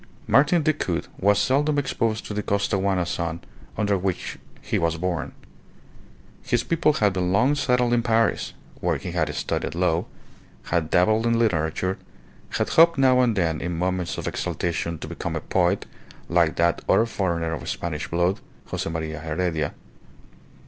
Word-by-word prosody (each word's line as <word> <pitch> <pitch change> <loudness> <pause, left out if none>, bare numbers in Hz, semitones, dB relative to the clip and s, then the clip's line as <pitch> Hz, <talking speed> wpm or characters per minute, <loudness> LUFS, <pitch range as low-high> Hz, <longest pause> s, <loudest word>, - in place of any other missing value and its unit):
Martin 150 +4 +4
Decoud 145 - 0
was 100 +1 +4
seldom 140 +8 +2
exposed 115 -5 -1
to - - -5
the 105 - -1
Costaguana 100 -2 0
sun 85 -1 -3 0.4
under 105 -2 +1
which 95 -1 -3 0.2
he - - -1
was 85 0 0
born. 85 -1 -2 1.1
His 120 -1 0
people 165 -1 +2
had 105 -7 +2
been 90 -1 0
long 125 +9 +3
settled 125 -3 +2
in 120 - +3
Paris, 115 -1 +1 0.3
where - - 0
he - - -6
had - - 0
studied - - -2
law, 85 -1 +1 0.6
had 85 -2 -1
dabbled 110 +6 +3
in 115 0 +2
literature, 95 -2 0 0.5
had - - -1
hoped 165 0 +6
now 130 -1 +5
and 120 -3 +2
then 80 -5 0
in 90 -1 -3
moments 90 0 -1
of - - -4
exaltation 85 -1 -2
to - - -7
become - - -4
a - - 0
poet - - +1 0.4
like 85 -2 +2
that 85 0 +2
other 115 - +5
foreigner 85 -7 -1
of 80 - -5
Spanish 80 -3 -3
blood, 85 +3 +1 0.3
Jose - - -3
Maria 80 -1 -4
Heredia. 80 0 -2
95 Hz, 155 wpm, -24 LUFS, 85-115 Hz, 1.1 s, hoped